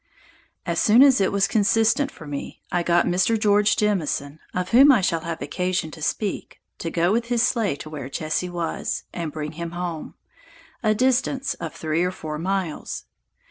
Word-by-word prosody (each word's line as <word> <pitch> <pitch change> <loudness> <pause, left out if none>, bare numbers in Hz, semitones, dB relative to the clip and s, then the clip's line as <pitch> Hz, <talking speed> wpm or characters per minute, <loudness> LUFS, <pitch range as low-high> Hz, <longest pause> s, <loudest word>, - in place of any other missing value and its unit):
As - - -1
soon 230 +4 +6
as 265 -6 +5
it 190 - +2
was 195 0 +2
consistent 225 +6 +2
for 160 - -13
me, 145 -1 -7
I 175 -2 +1
got 175 0 +2
Mr. 190 +6 +2
George 210 0 +3
Jemison, 160 -8 -1
(of 180 0 -3
whom 270 +5 +7
I 250 - +5
shall 170 -3 +1
have 165 0 -5
occasion 180 -3 -2
to 160 - -11
speak,) 200 +6 -3 0.2
to 165 - -3
go 170 +2 +1
with 230 +2 +1
his 240 0 +1
sleigh 225 - +1
to 150 - -9
where 140 -4 -6
Jesse 155 +5 -2
was, 170 -2 -3
and 165 -3 -4
bring 150 -1 -5
him 170 +1 -6
home, 175 -3 -5 0.7
a 215 -3 +2
distance 260 +3 +1
of 165 -2 -7
3 160 +2 -1
or 180 - +1
4 155 -4 -6
miles. 185 -2 -3
180 Hz, 180 wpm, -23 LUFS, 165-220 Hz, 0.7 s, whom